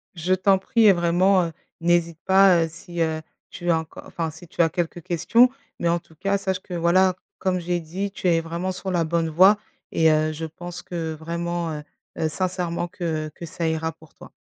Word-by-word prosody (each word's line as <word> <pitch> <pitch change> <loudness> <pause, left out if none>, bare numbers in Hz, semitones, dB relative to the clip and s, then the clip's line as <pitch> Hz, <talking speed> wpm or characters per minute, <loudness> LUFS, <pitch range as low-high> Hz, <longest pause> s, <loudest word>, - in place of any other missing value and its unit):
Je 175 +2 0
t'en 190 +1 +4
prie 220 +4 +2
et 205 - +8
vraiment, 180 +2 +3
heu, 165 - -4 0.3
n'hésite 170 -1 +1
pas, 190 -3 +6
heu, - - -1
si, 170 +1 -6
heu, 160 -1 0 0.3
tu 175 -1 -5
as 165 - +3
enco 160 0 -9
enfin 165 -1 -3
si 160 +3 -13
tu 170 - -1
as 165 - +4
quelques 175 +1 -3
questions. 230 +8 +4 0.3
Mais 170 - 0
en 170 +1 +2
tout 160 - -22
cas, 195 +5 0
sache 190 -2 -2
que, 185 - -9
voilà, 175 +2 +3 0.2
comme 185 -1 0
j'ai 175 0 -1
dit 185 +5 -4
tu 190 - -3
es 165 -2 +3
vraiment 170 +3 -3
sur 190 +1 -5
la 175 -2 +2
bonne 165 0 0
voie 190 +6 +6 0.3
et 160 -1 +4
heu, 155 0 +2
je 160 +1 -5
pense 175 +3 -8
que 165 -3 -4
vraiment, 170 +1 -3
heu 150 -1 -6 0.3
heu, 160 - +1
sincèrement 175 0 -2
que 165 -4 -3
que 170 - -7
ça 165 +1 -3
ira 160 0 -1
pour 160 -1 -20
toi. - - -14
170 Hz, 215 wpm, -24 LUFS, 165-185 Hz, 0.3 s, et